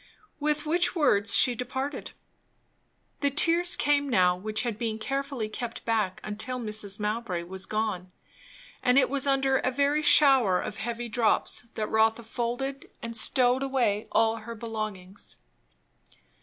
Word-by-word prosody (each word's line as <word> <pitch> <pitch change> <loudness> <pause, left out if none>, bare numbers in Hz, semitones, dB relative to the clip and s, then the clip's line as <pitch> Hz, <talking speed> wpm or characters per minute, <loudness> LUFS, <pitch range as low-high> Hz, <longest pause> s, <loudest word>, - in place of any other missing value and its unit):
With 300 0 -1
which 345 +4 +1
words 225 - +2
she 250 - +5
departed. 260 +4 -5 1.1
The 285 - +1
tears 335 +5 +3
came 285 -1 +1
now, 180 -6 +3
which 215 +4 -1
had 230 -3 -4
been 225 -2 -2
carefully 275 0 -3
kept 235 +2 -7
back 215 -5 -1
until 215 +4 -5
Mrs. 210 -3 -3
Mowbray 210 -4 -3
was 190 +2 -6
gone; 215 -4 -2 0.7
and 250 +1 +3
it 275 - +3
was 280 0 0
under 270 -1 +2
a 255 - 0
very 285 +3 +1
shower 265 - +5
of 210 - -6
heavy 235 +2 -4
drops 230 +1 +1
that 215 - -2
Rotha 220 +2 +1
folded 245 +4 -4
and 230 0 -5
stowed 250 +2 +3
away 245 -6 0
all 225 0 +2
her 230 +1 -8
belongings. 215 -4 -7
235 Hz, 140 wpm, -27 LUFS, 215-270 Hz, 1.1 s, she